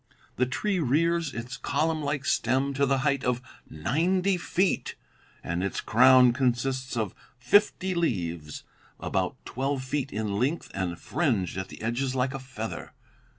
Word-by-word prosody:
The 125 - +2
tree 195 +8 -1
rears 165 +2 +1
its 120 +2 -6
column 160 0 0
like 145 -1 -2
stem 130 +4 +1
to 140 0 +2
the 135 0 +2
height 140 -3 +1
of 125 -1 +1 0.3
ninety 180 - +1
feet, 180 +1 0 0.5
and 85 +1 -2
its 100 - -2
crown 125 +1 +6
consists 130 0 0
of 110 -5 -1 0.2
fifty 190 +8 +3
leaves 85 - -2 0.4
about - - -1
twelve 135 +1 -2
feet 135 +1 -2
in 105 -1 -2
length 140 +8 -1
and 90 -3 -2
fringed 120 - 0
at 95 0 -3
the - - -11
edges 125 +3 -1
like 130 +1 0
a 135 - -4
feather. 125 -4 -6
130 Hz, 150 wpm, -27 LUFS, 115-150 Hz, 0.5 s, crown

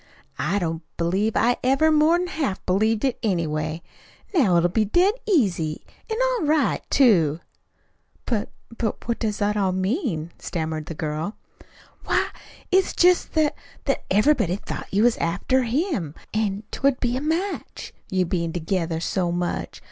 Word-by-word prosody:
I 170 +9 0
don't 165 -4 -2 0.2
believe 190 +6 +1
I 245 +2 +3
ever 275 +5 +4
more 310 +2 +5
'n 355 +1 0
half 310 - -3
believed 215 +5 +2
it, 260 -3 0
anyway. 160 -6 -1 0.5
Now 220 - +4
it'll 170 +1 +4
be 215 +5 +1
dead 350 - +3
easy, 185 - +1 0.2
an' 445 - -1
all - - +1
right, 300 -2 +2
too." 170 - +4 0.9
"But 220 -3 -1 0.3
but 225 -2 -3
what 235 - -1
does 210 -2 -1
it 210 +1 +1
all 195 -3 +1
mean?" 185 - -1
stammered 160 -2 -3
the 165 - -6
girl. 155 +6 -3 0.7
"Why, - - +1 0.4
it's 380 0 +3
jest 360 0 +3
that 310 -2 +2 0.3
that - - 0
everybody 210 - +3
thought 205 - -7
you 205 +3 +3
was 240 -1 +4
after 185 +10 +1
him, 240 - -1 0.2
an't 210 -1 -2
would 275 -1 +3
be 245 -1 0
a 260 - -2
match 335 +6 -3 0.2
you 185 -1 +1
bein' 170 -2 -2
together 165 -1 -1
so 175 +1 -1
much. 175 0 -3
210 Hz, 155 wpm, -24 LUFS, 170-275 Hz, 0.9 s, more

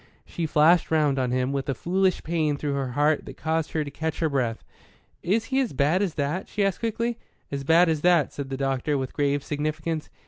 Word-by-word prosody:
She 165 -2 -3
flashed 160 +4 +4
round 150 -4 +2
on 130 -1 0
him, 130 +2 0
with 140 0 -3
a 135 - 0
foolish 185 +5 0
pain 155 -3 0
through 145 0 -2
her 135 -3 -2
heart 150 +2 +2
that - - -9
caused 160 0 -1
her 155 - 0
to 140 - -7
catch 160 +2 -3
her 160 - +1
breath. 125 -5 -1 0.6
"Is 215 +6 +1
he 265 - +3
as 255 - -1
bad 150 +7 +2
as 190 -6 -1
that?" 150 +6 -2
she 205 -1 0
asked 195 - -1
quickly. 230 +1 -2 0.3
"As 140 -1 -3
bad 165 +5 +5
as 160 -2 0
that," 175 -3 +3
said 140 -2 -5
the 135 - -3
doctor, 135 +1 0
with 130 -1 -4
grave 145 -1 0
significance. 155 +2 -3
150 Hz, 220 wpm, -25 LUFS, 140-170 Hz, 0.6 s, bad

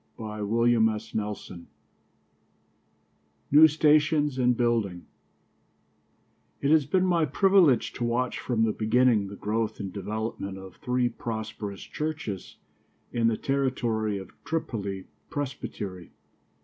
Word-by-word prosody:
CHAPTER 110 -2 -5
VI 110 -4 0 1.9
NEW 155 +2 +10
STATIONS 150 -2 +3
AND 125 -1 +3
BUILDINGS 115 -7 0 1.5
It 140 - +1
has 155 -4 +4
been 185 +4 +2
my 170 -3 +3
privilege 175 - +4
to - - -4
watch 120 +2 0
from 115 -3 0
the 110 - +2
beginning 110 -1 +2
the 100 - -8
growth 110 +2 -2
and 95 -2 -5
development 105 -1 -4
of 95 -1 -11
three 125 0 0
prosperous 110 -3 -5
churches 150 -11 -5 0.6
in 115 -1 +2
the 115 -1 +1
territory 120 -6 0
of 95 - -9
Tripoli 100 - -3 0.2
Presbytery. 105 - -5
115 Hz, 110 wpm, -27 LUFS, 105-135 Hz, 1.9 s, NEW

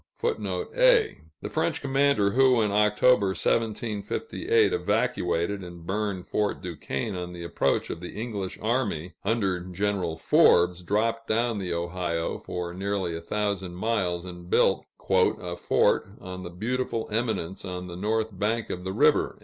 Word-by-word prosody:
[A] 465 0 +2 0.3
The - - -3
French - - 0
commander 135 -7 +2
who, 130 +1 +5
in 105 - 0
October, 105 +1 +4
1758, 115 - 0
evacuated 95 - 0
and 85 -2 -10
burned 100 -1 -2
Fort 105 -1 -1
Duquesne 85 +1 -4
on 90 -1 -5
the 85 -1 -7
approach 85 - 0
of - - -5
the 90 +4 -7
English 105 -5 -4
army 105 -8 -1
under 100 -4 +1
General 90 -2 -2
Forbes, 90 +2 +4
dropped 115 +5 0
down 115 0 +1
the 90 -2 -3
Ohio 85 -1 -2
for 90 -1 -5
nearly 95 -2 -2
a 85 - -5
thousand 95 -1 -2
miles, 95 -4 -1
and 90 -1 -9
built - - +3 0.2
"a 95 -1 +5
new 90 -1 -5
fort 95 - +2
on 95 -1 -7
a - - -7
beautiful 115 +5 -2
eminence 110 -6 -2
on 90 -1 -5
the 90 -1 -7
north 110 +2 -1
bank 110 +2 0
of 90 - -5
the 95 +1 -3
river." - - +3
100 Hz, 150 wpm, -27 LUFS, 90-115 Hz, 0.3 s, who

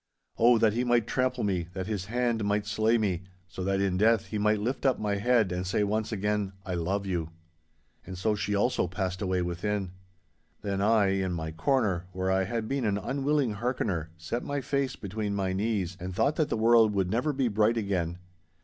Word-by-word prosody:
'Oh, 120 +1 +6
that 110 -2 +3
he 120 +2 0
might 120 -2 +2
trample 130 0 0
me, 90 -5 0
that 95 -1 -4
his 100 -3 -3
hand 120 0 0
might 105 0 0
slay 110 +3 +2
me, 95 -6 0 0.3
so 90 +1 -6
that 95 +1 0
in 95 -2 +1
death 110 +2 +3
he 105 - -4
might 105 +1 +3
lift 125 +5 -2
up 135 -2 +3
my 105 -1 -1
head 115 -2 +2
and 90 0 -2
say 105 +2 +1
once 105 +2 -1
again, 105 -1 -1
"I 95 - -3
love 95 +4 -1
you."' 85 -4 -2 0.7
And 95 - -8
so 105 +4 +1
she 105 0 -1
also 105 -2 +1
passed 90 +1 -3
away 95 -2 0
within. 95 +2 -2 0.7
Then 100 -1 -1
I, 105 -1 +4
in 95 -2 -1
my 80 -2 -3
corner, 95 - 0
where 95 +1 -1
I 95 0 +2
had 110 +2 -3
been 135 +1 -1
an 100 -2 +1
unwilling 135 +3 0
hearkener, 105 -9 -1
set 85 +9 -4
my 140 0 -2
face 135 0 -1
between 105 +1 -3
my 95 -2 -1
knees 95 -3 -1
and 90 +1 -5
thought 140 +9 +2
that 155 -2 +1
the - - 0
world 115 -1 +5
would 95 -2 +1
never 125 +7 +1
be 135 -3 0
bright 110 +1 +2
again. 90 -5 -1
105 Hz, 205 wpm, -28 LUFS, 95-115 Hz, 0.7 s, Oh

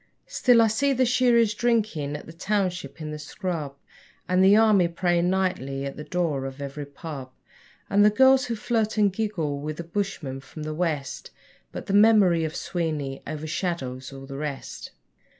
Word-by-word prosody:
Still 245 - +4
I - - +4
see 275 +6 +1
the 255 0 +2
shearers 240 -3 +3
drinking 210 -11 0
at - - -12
the 165 - -11
township 185 -1 -2
in 155 0 -5
the 150 - -6
scrub, 155 -3 -4 0.5
And 185 +1 +3
the 195 +2 +7
army 215 -5 +5
praying 175 0 +1
nightly 180 -8 -1
at 140 - -5
the 150 - -7
door 160 -6 -1
of 135 +1 -7
every 140 +1 -6
pub, 140 -3 -8 0.6
And 205 +1 +4
the 210 - +7
girls 265 +4 +5
who 235 -2 -2
flirt 220 -1 -1
and 205 -3 +3
giggle 185 -10 -2
with 150 +1 -5
the 170 - -5
bushmen 170 -7 -3
from 150 +3 -10
the 155 0 -4
west 155 -5 -3 0.4
But - - -7
the 195 - -3
memory 200 -5 +5
of 160 +1 -3
Sweeney 155 -8 -3
overshadows 150 -4 -4
all 135 0 -9
the 135 0 -7
rest. 145 -2 -6
175 Hz, 175 wpm, -25 LUFS, 145-210 Hz, 0.6 s, the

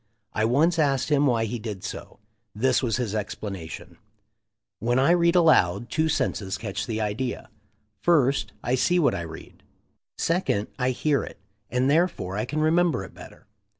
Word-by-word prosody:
I 110 - +1
once 160 +9 +2
asked 140 -3 +1
him 145 -1 +3
why 115 -3 +2
he 115 +2 -4
did 105 -4 -6
so. - - -7 0.4
This 130 +4 +2
was 120 -3 0
his 120 -5 -2
explanation: 95 -5 -6 0.8
"When 120 +2 +1
I 135 +5 +4
read 170 0 +3
aloud 120 - +3
two 160 0 +1
senses 100 -9 -1
catch 100 -4 -4
the 110 -2 -2
idea: 110 +4 -3 0.5
first, 140 -6 +2
I 125 - -1
see 175 +7 +2
what 150 - +3
I 90 - -3
read; 85 -2 -10 0.6
second, 165 - 0
I 125 0 +1
hear 140 +2 +1
it, - - -9 0.3
and 125 +2 +1
therefore 155 - +1
I 105 - -1
can 150 +4 -2
remem 170 +2 +3
ber 95 - -3
it - - -11
better." - - -14
125 Hz, 170 wpm, -25 LUFS, 105-155 Hz, 0.8 s, I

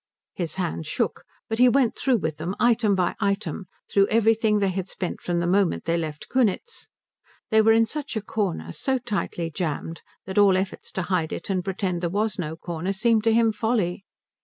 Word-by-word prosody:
His 170 -4 -4
hands 85 - -3
shook, - - -2 0.2
but 225 +1 -3
he 250 0 +7
went 255 -2 +2
through 260 -3 +2
with 160 -5 -3
it 160 - -3
item 225 -4 +3
by 180 -2 0
item, 200 -1 -1 0.2
through 200 0 +3
everything 220 -1 +3
they 200 -1 +2
had 190 0 -4
spent 180 - -4
from 175 -1 -1
the 170 - 0
moment 190 +1 +2
they 165 +1 +1
left 155 -3 -4
Kunitz. 260 - -1 0.6
They 220 0 +6
were 220 +1 +5
in 225 0 +4
such 290 +3 -5
a 220 - -1
corner, 185 - -2
so 265 - -1
tightly 205 -8 -3
jammed, 165 0 -3 0.2
that 190 +2 0
all 195 -2 +6
efforts 190 0 -4
to 190 - -2
hide 175 -3 -1
it - - -4
and 185 -2 0
pretend 185 -2 -2
there 175 - 0
was 205 +2 -1
no 160 -2 -3
corner 170 +3 -3
seemed 220 +2 +2
to 225 - +5
him 225 0 +4
folly. 210 -5 -1
195 Hz, 200 wpm, -25 LUFS, 175-225 Hz, 0.6 s, he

